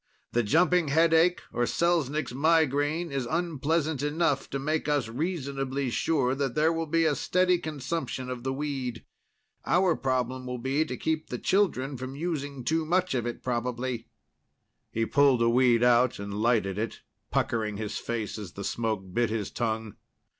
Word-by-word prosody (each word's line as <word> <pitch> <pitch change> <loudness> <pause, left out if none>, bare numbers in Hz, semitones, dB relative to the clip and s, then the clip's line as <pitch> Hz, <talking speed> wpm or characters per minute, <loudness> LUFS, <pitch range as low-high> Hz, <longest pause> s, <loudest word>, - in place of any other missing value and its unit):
The 120 - +2
jumping 170 +8 +3
headache, 165 +4 +4
or 120 - +1
Selznick's 155 -5 0
migraine, 155 +2 +2
is 135 -3 -2
unpleasant 160 -2 0
enough 145 -1 0
to 140 - -2
make 150 +2 -1
us 145 -5 +1
reasonably 135 -2 -2
sure 135 -2 +1
that 135 -2 -2
there 155 +2 +3
will 165 0 -2
be 165 +1 +2
a 155 - +3
steady 180 +4 +2
consumption 145 -4 -4
of 125 -1 -5
the 130 +2 -2
weed. 135 -4 -4 0.6
Our 180 -1 +3
problem 130 -1 -1
will 125 0 -3
be 135 +6 0
to - - -5
keep 160 -1 -1
the 125 - -3
children 145 -7 +1
from 130 +2 -6
using 145 -4 -3
too 160 +5 +1
much 180 +2 +1
of 120 -2 -1
it, 120 - -5
probably." 125 -1 -2 0.8
He 115 0 0
pulled 135 -2 +4
a 115 - +4
weed 120 -1 +4
out 125 0 +4
and 100 0 -6
lighted 105 -2 +1
it, 115 +1 -4 0.3
puckering 110 -3 0
his 105 -1 -4
face 115 -2 -4
as 100 -6 -8
the 100 - -6
smoke 105 -4 -2
bit 120 +1 +2
his 110 -2 -3
tongue. 110 -2 -3
135 Hz, 165 wpm, -28 LUFS, 120-160 Hz, 0.8 s, headache